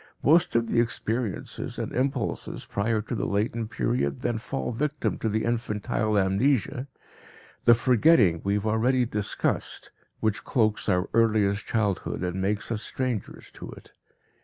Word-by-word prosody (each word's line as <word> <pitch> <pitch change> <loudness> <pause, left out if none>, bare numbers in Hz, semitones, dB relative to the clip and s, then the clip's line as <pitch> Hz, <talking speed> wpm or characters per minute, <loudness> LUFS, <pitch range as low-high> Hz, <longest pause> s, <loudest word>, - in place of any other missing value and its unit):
Most 165 0 +4
of 115 0 +3
the 115 - +1
experiences 115 -1 -3
and - - -4
impulses 135 0 -2
prior 105 +1 -1
to 115 - -6
the 115 - -1
latent 110 +2 -1
period 65 - -1
then 115 -2 -1
fall 135 +2 -3
victim 150 +5 -2
to 110 - -1
the 110 +1 0
infantile 110 -2 -1
amnesia, 120 +6 +1 0.8
the 120 - +8
forgetting 120 - +4
we 100 +1 +1
have 105 0 -2
already 120 +4 +2
discussed, 105 -3 -2 0.3
which 110 -2 -1
cloaks 110 -4 +1
our 90 0 +2
earliest 110 -3 +2
childhood 105 -4 -1
and 90 +1 -2
makes 105 +3 -1
us 110 -2 -2
strangers 125 -5 -4
to - - -10
it. - - -15
110 Hz, 145 wpm, -26 LUFS, 100-120 Hz, 0.8 s, the